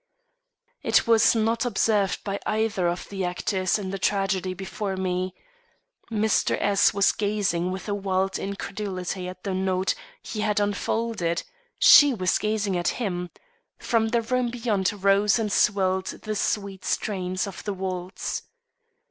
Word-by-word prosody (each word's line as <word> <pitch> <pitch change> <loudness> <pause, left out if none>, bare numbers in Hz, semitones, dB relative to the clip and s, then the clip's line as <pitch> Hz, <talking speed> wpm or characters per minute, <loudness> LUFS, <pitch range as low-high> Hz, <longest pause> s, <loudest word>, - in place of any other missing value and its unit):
It - - +3
was 230 0 +5
not 225 +1 +1
observed 215 -5 +1
by 200 -1 -3
either 215 -4 0
of 175 +1 -3
the 195 -2 -3
actors 185 +2 0
in 190 -3 -5
the 195 - -4
tragedy 195 -2 0
before 195 +1 -4
me. 185 0 -2 0.8
Mr. 220 -1 +1
S 200 -1 +3
was 200 -1 +3
gazing 200 -4 0
with 190 +2 -5
a 205 - -1
wild 195 -1 -1
incredulity 195 -2 -4
at 185 0 -9
the 195 - -2
note 190 0 0 0.3
he 215 - -4
had 210 0 +1
unfolded; 205 -3 -1 0.3
she 290 -3 +8
was 185 -3 +1
gazing 210 -2 0
at 175 0 -1
him. 180 -6 -3 0.5
From 225 -2 +1
the 235 0 +1
room 250 +1 0
beyond 225 -6 0
rose 200 +1 +4
and 220 -3 -1
swelled 190 -2 +2
the 215 -1 -5
sweet 195 -2 -2
strains 185 -2 -1
of 195 -2 -8
the 205 - -2
waltz. 185 -1 -4
195 Hz, 145 wpm, -25 LUFS, 185-215 Hz, 0.8 s, she